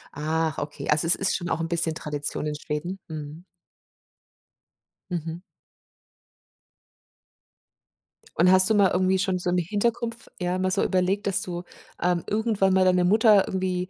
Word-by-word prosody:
Ach, 155 +1 -1
okay, 145 0 -6
also 155 +2 +2
es 175 - +5
ist 195 - 0
schon 175 -2 -4
auch 165 - -1
'n 165 - -2
bisschen 165 -1 0
Tradition 150 -1 -4
in 150 - -2
Schweden, 150 +5 -5
mhm. 155 +1 -8 1.7
Mhm. 165 0 -5 2.9
Und 180 +2 +4
hast 185 +1 +8
du 220 - +3
mal 200 -3 +4
irgendwie 185 +1 +1
schon 190 -1 0
so 180 - -2
im 180 - +1
Hintergrund 225 +6 -1
f 235 - -17
ja 180 0 -1
mal 185 0 -1
so - - +1
überlegt, 190 +2 0
dass 195 - +1
du, 175 -1 -5 0.4
ähm, 175 -1 0
irgendwann 210 -3 +1
mal 190 0 +3
deine 180 -1 +3
Mutter 210 +1 +4
irgendwie, 185 -1 -2
180 Hz, 155 wpm, -25 LUFS, 165-190 Hz, 2.9 s, hast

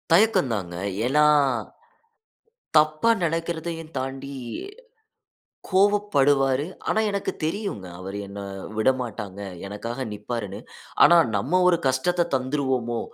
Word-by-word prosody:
தயக்கம் 185 - +4
தாங்க. 90 -5 -4 0.3
ஏன்னா? 150 +4 +4 1.5
தப்பா 155 +8 +4
நினைக்கிறதையும் 165 0 -3
தாண்டி 135 +1 -5 1.4
கோவப்படுவாரு. 145 -9 +3 0.2
ஆனா - - +2
எனக்கு 200 0 -2
தெரியுங்க. 160 - -3
அவரு 95 +2 -6
என்ன 100 +1 -8 0.4
விடமாட்டாங்க. 110 -5 -1 0.3
எனக்காக 115 +6 -5
நிற்பாருன்னு. 105 -1 -5 0.5
ஆனா 175 - +7 0.2
நம்ம 180 - +1
ஒரு 175 -1 +4
கஷ்டத்த 170 +7 +1
தந்துருவோமோ! 130 -3 -1
135 Hz, 90 wpm, -24 LUFS, 115-170 Hz, 1.5 s, ஆனா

